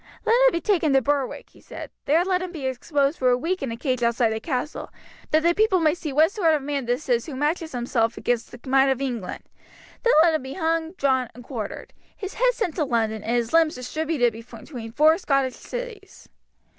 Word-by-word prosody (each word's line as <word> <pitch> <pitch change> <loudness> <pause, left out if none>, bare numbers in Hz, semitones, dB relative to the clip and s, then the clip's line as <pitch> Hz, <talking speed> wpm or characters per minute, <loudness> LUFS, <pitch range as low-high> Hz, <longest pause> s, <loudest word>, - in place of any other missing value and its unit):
Let - - +3
him - - +5
be 340 - -2
taken 335 -8 +2
to 270 - +5
Berwick," 280 0 -2
he - - -20
said; - - -9
"there 325 +5 +3
let 370 -1 +1
him 370 -1 -5
be 310 -6 -6
exposed 275 +3 0
for 255 - +3
a 245 - +3
week 350 +8 -2
in 270 -4 -3
a 230 - -5
cage 255 -1 -1
outside 235 -1 +2
the 220 - -3
castle, 260 +3 -4 0.4
that 310 +1 +3
the 340 0 +4
people 410 -1 +3
may 310 -2 +3
see 320 -4 -5
what 310 +6 +4
sort 335 -7 +2
of 290 - -3
a - - -9
man 280 -3 -2
this 245 +5 -2
is 240 0 +1
who 295 - -6
matches 315 +3 -1
himself 235 -1 0
against 240 -1 -1
the 245 - -11
might 270 +1 +4
of 265 -1 +1
England. 240 -9 -4 0.6
Then 480 - +3
let 335 -1 +4
him 315 - 0
be 265 +1 -7
hung, 330 -1 -1
drawn, 265 -7 +1
and 245 - -11
quartered, 235 -5 -6 0.2
his 390 -1 -6
head - - +2
sent 390 -9 -3
to 320 - +2
London, 225 -5 0
and 230 +3 -1
his 235 +1 -1
limbs 330 -1 +4
distributed 255 -1 -1
between 230 +1 -9
four 310 +7 +4
Scotch 275 -6 +1
cities." - - -8
275 Hz, 225 wpm, -24 LUFS, 245-330 Hz, 0.6 s, him